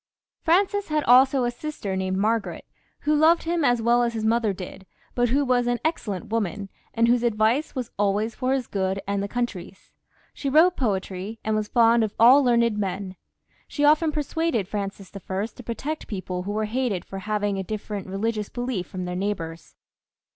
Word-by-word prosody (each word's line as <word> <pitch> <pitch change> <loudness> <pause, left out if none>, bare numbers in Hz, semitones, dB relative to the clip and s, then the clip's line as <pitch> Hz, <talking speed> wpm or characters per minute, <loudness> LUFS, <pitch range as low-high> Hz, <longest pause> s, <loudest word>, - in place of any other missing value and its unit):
Francis 390 +4 +2
had 305 -1 0
also 260 +2 +5
a 240 - 0
sister 240 -7 -5
named 190 0 -1
Margaret, 220 +2 -1 0.4
who 300 - +1
lo"^ed 320 +3 +4
him 335 -1 0
as 245 -4 +2
well 240 +1 +4
as 235 -1 0
his 220 -1 -2
mother 225 -1 +2
did, 190 0 -9 0.3
but 245 -1 +1
who 280 +4 +2
was 245 -1 +2
an 245 0 0
excellent 210 - -2
woman, 205 -3 -2 0.3
and 230 0 +3
whose 240 0 +3
advice 235 +6 +1
was 250 -3 -4
always 205 +2 +1
for 255 +2 -2
his 265 -2 -1
good 190 -2 -2
and 200 0 -1
the 200 - -2
country's. 205 -5 -5 0.4
She 275 - -3
wrote 330 +6 +5
poetry, 195 -2 -2
and 220 0 0
was 215 -1 -1
fond 230 0 +4
of 215 -1 -3
all 255 +5 +7
learned 235 -3 +2
men; 195 -1 -3 0.5
she 290 - 0
often 310 +2 +4
persuaded 300 - -1
Francis 200 -1 -5
I. 195 +1 -3
to 230 +2 -11
protect 280 +7 -4
people 185 -3 -4
who 195 +3 -4
were 215 +1 -1
hated 225 -4 -2
for 195 - -7
having 205 -1 -1
a - - -2
different 205 0 -5
religious 210 +2 -2
belief 245 -8 -3
from 185 -1 -5
their 180 0 -4
neighbours. 170 -5 -4
225 Hz, 185 wpm, -24 LUFS, 200-255 Hz, 0.5 s, all